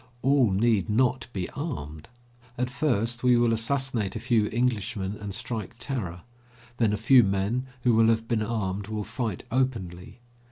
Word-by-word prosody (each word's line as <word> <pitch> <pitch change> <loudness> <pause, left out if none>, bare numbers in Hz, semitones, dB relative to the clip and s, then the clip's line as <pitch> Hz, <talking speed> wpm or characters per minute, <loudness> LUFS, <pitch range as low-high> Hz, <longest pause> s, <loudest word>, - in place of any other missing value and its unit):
All 135 -3 +4
need 100 0 +2
not 125 +4 +1
be 95 -5 -3
armed. 80 - -6 0.5
At 125 0 -1
first, 120 -4 0
we 125 -1 +4
will 120 -1 +3
assassinate 115 -3 0
a - - -3
few 115 -2 +2
Englishmen 105 -4 -1
and 105 -1 -6
strike 110 +1 -5
terror; 95 -11 -4 0.5
then 115 -3 +2
a 105 - 0
few 125 +4 +6
men 100 +6 -1 0.2
who 120 - +4
will 110 0 +5
have 115 0 +1
been 115 -2 0
armed 105 -3 -2
will 105 -1 -3
fight 110 -2 -4
openly. 115 -7 -2
115 Hz, 160 wpm, -26 LUFS, 100-125 Hz, 0.5 s, few